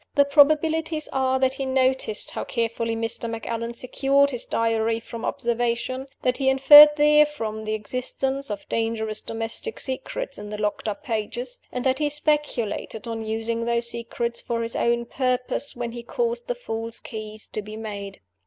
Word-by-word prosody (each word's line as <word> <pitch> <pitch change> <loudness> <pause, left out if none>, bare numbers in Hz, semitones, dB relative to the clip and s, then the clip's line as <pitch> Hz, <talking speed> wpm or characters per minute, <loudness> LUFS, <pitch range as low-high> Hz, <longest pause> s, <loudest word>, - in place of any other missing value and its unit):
The 285 -1 +5
probabilities 310 +2 +3
are 265 -1 +2
that 260 0 +2
he 270 - -4
noticed 260 -4 +1
how - - -4
carefully 230 -1 -2
Mr. 225 +1 -2
Macallan 230 +1 -4
secured 275 +3 +2
his 245 -3 -1
Diary 225 0 0
from 230 0 -9
observation; 240 +2 -1 0.2
that 250 0 +1
he 265 -1 +3
inferred 295 +3 +9
therefrom 295 -8 +2
the 215 0 -1
existence 265 +4 -1
of 205 -1 -6
dangerous 220 -1 0
domestic 225 - -3
secrets 265 +1 -3
in 205 0 -8
the 210 - -5
locked 210 +1 -2
up 215 +8 -4
pages; 240 0 -3
and 250 - -3
that 260 +1 +2
he 300 -1 +1
speculated 290 -7 -1
on 225 -1 -4
using 225 +1 -2
those 235 0 0
secrets 235 0 -4
for 230 -1 -2
his 230 - -5
own 235 0 +1
purpose 255 +2 -1
when 240 -1 -4
he 240 0 -7
caused 475 - -2
the - - -1
false 230 - -4
keys 215 -1 -7
to 215 - -4
be 215 +1 -9
made. 200 -3 -7
235 Hz, 165 wpm, -24 LUFS, 225-270 Hz, 0.2 s, inferred